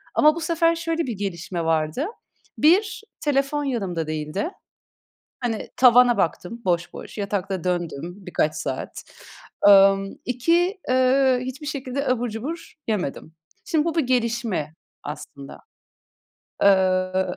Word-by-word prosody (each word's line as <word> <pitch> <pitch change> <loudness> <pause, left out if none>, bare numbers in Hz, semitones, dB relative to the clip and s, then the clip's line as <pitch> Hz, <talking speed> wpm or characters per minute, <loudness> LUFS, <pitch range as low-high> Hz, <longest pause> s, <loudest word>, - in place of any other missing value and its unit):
ama 305 +1 +5
bu - - -4
sefer 330 +1 +2
şöyle 330 0 -2
bir 225 -5 -4
gelişme 175 -3 -4
vardı. 160 - 0 0.5
1 380 +8 +3 0.2
telefon 290 0 0
yanımda 195 - -2
değildi. 155 - -3 0.9
Hani 235 -4 -3
tavana 245 -2 +6
baktım 190 +6 -2
boş 175 -1 0
boş, - - -10
yatakta 195 -2 -2
döndüm 175 -2 -3
birkaç 155 -4 0
saat. 135 -4 -5 0.6
Imm, 195 0 +6
2 335 - +1
eee, 260 0 +4
hiçbir 260 +4 -6
şekilde 275 -1 -3
abur 245 -1 0
cubur 265 +10 -6
yemedim. 185 -7 -3 0.3
Şimdi 315 -1 +1
bu 335 -1 -1
bir 325 - +2
gelişme 230 - -1 0.3
aslında. 140 -1 -9 1.0
Iıı, 185 -1 +2
225 Hz, 120 wpm, -23 LUFS, 180-275 Hz, 1.0 s, tavana